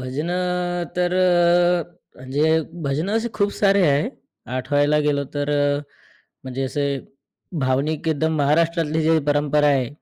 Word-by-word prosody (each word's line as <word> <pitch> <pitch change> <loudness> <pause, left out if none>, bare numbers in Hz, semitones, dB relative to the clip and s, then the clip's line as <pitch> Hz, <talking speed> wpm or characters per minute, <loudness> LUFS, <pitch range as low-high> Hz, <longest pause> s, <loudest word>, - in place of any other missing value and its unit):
भजनं 175 +6 -2
तर 180 0 +1
अ, 175 -1 +3 0.3
म्हणजे 145 +5 +1 0.3
भजनं 155 +8 -1
असे 230 +1 -1
खूप 205 -1 0
सारे 200 -2 +3
आहे. 145 +10 +2 0.5
आठवायला 145 +3 +1
गेलो 140 -1 +1
तर 145 0 -1
अ, 145 0 +1 0.6
म्हणजे 130 +1 -4
असे 140 +2 -2 0.8
भावनिक 140 +5 0
एकदम 160 +1 0
महाराष्ट्रातली 160 +2 +1
जी 160 +1 +3
परंपरा 150 0 +2
आहे. 135 -4 +1
155 Hz, 125 wpm, -22 LUFS, 145-175 Hz, 0.8 s, अ